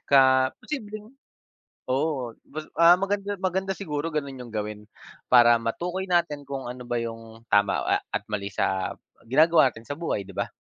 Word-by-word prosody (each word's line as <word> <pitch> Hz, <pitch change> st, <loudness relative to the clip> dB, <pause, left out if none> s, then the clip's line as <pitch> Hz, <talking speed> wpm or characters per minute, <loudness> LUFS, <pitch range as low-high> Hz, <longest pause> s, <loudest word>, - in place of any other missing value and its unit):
ka 140 Hz, -1 st, +7 dB, 0.4 s
posibleng, 215 Hz, -5 st, -7 dB, 0.8 s
oo 130 Hz, -2 st, -1 dB, 0.2 s
mas 155 Hz, +2 st, -6 dB, 0.2 s
ah, 170 Hz, +1 st, +8 dB
maganda 200 Hz, +1 st, -1 dB
maganda 190 Hz, +1 st, -1 dB
siguro 155 Hz, -4 st, -3 dB
gano'n 140 Hz, -4 st, -3 dB
yung 120 Hz, -2 st, -9 dB
gawin 105 Hz, 0 st, -3 dB, 0.5 s
para 120 Hz, -1 st, +7 dB
matukoy 175 Hz, +11 st, -3 dB
natin 170 Hz, -5 st, +1 dB
kung 135 Hz, -1 st, -4 dB
ano 125 Hz, 0 st, -8 dB
ba 120 Hz, -, -1 dB
yung 115 Hz, 0 st, -8 dB
tama 100 Hz, -1 st, +3 dB
a -, -, +2 dB, 0.2 s
at -, -, -1 dB
mali 100 Hz, -1 st, -2 dB
sa 95 Hz, -1 st, 0 dB, 0.4 s
ginagawa 155 Hz, +1 st, +5 dB
natin 110 Hz, +1 st, -13 dB
sa 145 Hz, -, -4 dB
buhay 165 Hz, -11 st, -2 dB
'di 100 Hz, -, -12 dB
ba? 100 Hz, -, -1 dB
140 Hz, 165 wpm, -26 LUFS, 115-175 Hz, 0.8 s, ah